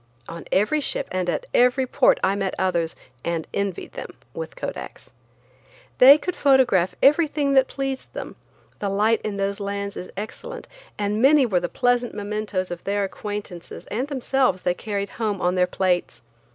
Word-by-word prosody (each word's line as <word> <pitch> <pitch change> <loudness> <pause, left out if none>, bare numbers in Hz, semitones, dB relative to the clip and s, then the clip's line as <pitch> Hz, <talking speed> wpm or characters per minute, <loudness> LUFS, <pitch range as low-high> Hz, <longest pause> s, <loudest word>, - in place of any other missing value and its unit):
On 170 0 -8
every 215 +11 +2
ship - - -1
and 185 -1 -1
at 155 - -2
every 250 +2 +4
port 255 +1 +3
I 190 - +3
met 195 -2 -2
others–and 165 -3 -2
envied 200 -3 -3
them–with 485 0 -8
Kodaks. - - -7 0.9
They 270 +3 +10
could 360 +3 -4
photograph 250 -10 +3
everything 295 -1 +3
that 265 -1 +5
pleased 270 -1 -4
them; - - -6 0.4
the 200 - -1
light 215 +3 +2
in 205 -2 -4
those 200 +1 -1
lands 200 0 -4
is 180 - -7
excellent, 210 +2 -7 0.3
and 210 +1 -1
many 275 +1 +6
were 190 -7 +1
the 175 0 -3
pleasant 245 -2 +1
mementos 205 -3 -3
of 175 -1 -6
their 200 +1 0
acquaintances 200 -3 -6
and 245 +6 -1
themselves 265 -7 0
they 180 - +2
carried 200 +1 -4
home 210 -3 0
on 180 0 +1
their 180 -1 +2
plates. 180 -7 -1
205 Hz, 160 wpm, -23 LUFS, 185-255 Hz, 0.9 s, They